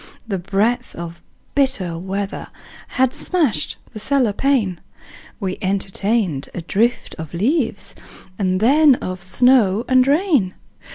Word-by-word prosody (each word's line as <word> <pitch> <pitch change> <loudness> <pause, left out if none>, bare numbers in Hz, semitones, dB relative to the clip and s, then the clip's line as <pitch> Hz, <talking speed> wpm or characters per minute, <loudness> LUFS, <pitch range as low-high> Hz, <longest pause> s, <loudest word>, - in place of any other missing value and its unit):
The 195 -4 -2
breath 215 +7 -1
of 170 0 -8 0.3
bitter 260 -12 +1
weather 195 +3 -4 0.5
Had 260 -1 +3
smashed 280 - -1 0.2
the 215 - -7
cellar 250 -1 +1
pane: 215 -8 0 0.6
We 190 -3 -3
entertained 195 - -1
a 175 - -3
drift 230 +7 0
of 160 +1 -7
leaves 230 - -1 0.5
And 185 -2 +1
then 280 +5 +5
of 185 -5 -6
snow 225 +1 +3
and 255 0 +4
rain. 285 - +2
210 Hz, 120 wpm, -20 LUFS, 185-255 Hz, 0.6 s, then